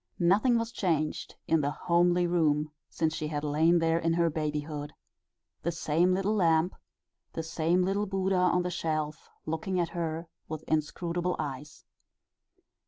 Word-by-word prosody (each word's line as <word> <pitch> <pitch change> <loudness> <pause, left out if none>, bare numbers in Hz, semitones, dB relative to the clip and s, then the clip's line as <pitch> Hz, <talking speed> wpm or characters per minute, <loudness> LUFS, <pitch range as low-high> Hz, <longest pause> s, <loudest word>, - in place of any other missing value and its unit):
Nothing 210 +8 +4
was 230 0 -2
changed 160 -9 -1
in 160 -1 +3
the 140 - 0
homely 175 +3 +2
room 155 -3 +1 0.2
since 160 -1 0
she 155 - -3
had 150 -1 -3
lain 155 +4 +3
there 165 0 +2
in 165 0 +1
her 170 -1 +2
babyhood: 150 -1 -3 0.7
the 170 - -1
same 165 +2 +1
little 195 +3 +1
lamp, 170 -3 +3 0.6
the 165 - -3
same 165 +2 +1
little 200 +3 0
Buddha 190 0 0
on 180 0 +3
the 180 - -2
shelf 155 -3 -3 0.2
looking 160 +4 -2
at 170 -2 0
her 165 -1 -3 0.2
with 155 0 -6
inscrutable 170 +3 -1
eyes. 150 0 -6
165 Hz, 150 wpm, -29 LUFS, 155-180 Hz, 0.7 s, Nothing